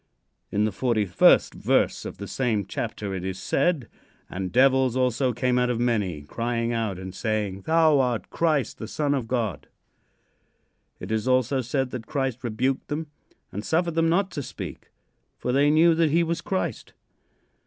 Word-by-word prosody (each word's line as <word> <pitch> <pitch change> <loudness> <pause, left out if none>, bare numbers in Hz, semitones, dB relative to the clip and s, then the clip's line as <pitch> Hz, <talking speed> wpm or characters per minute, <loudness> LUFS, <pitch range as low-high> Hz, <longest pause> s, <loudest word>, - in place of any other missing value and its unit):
In 105 +1 +2
the 110 - 0
forty 110 +1 0
first 90 - +4
verse - - +1
of - - -7
the - - -6
same 115 -6 -1
chapter 100 +1 -4
it 95 -2 -4
is 95 0 -3
said: 135 - 0 0.4
"And 95 0 -4
devils 130 0 +4
also 125 0 +1
came 125 +1 +1
out 125 0 +1
of 120 -2 -1
many, 105 -11 0
crying 115 +7 -2
out 110 -5 -1
and 95 0 -7
saying, 105 -3 -2
'Thou 160 -2 +4
art 125 -3 -1
Christ, 155 -7 0
the 110 - -5
Son 145 +4 0
of 130 -5 -2
God.'" 110 - -2 1.3
It 90 - -7
is 110 +2 -1
also 130 +1 +2
said 130 +1 -1
that 115 -3 -6
Christ 135 -3 -2
rebuked 125 +3 -1
them 150 0 -4 0.4
and 105 +2 -5
suffered 170 +4 0
them 165 0 +2
not 190 +3 +1
to 145 - -4
speak, - - -8 0.5
for 125 - -2
they 140 +3 +4
knew 165 +3 +5
that 165 -1 +2
he 170 +3 +3
was 170 +1 -2
Christ. 170 - -3
125 Hz, 175 wpm, -25 LUFS, 110-145 Hz, 1.3 s, knew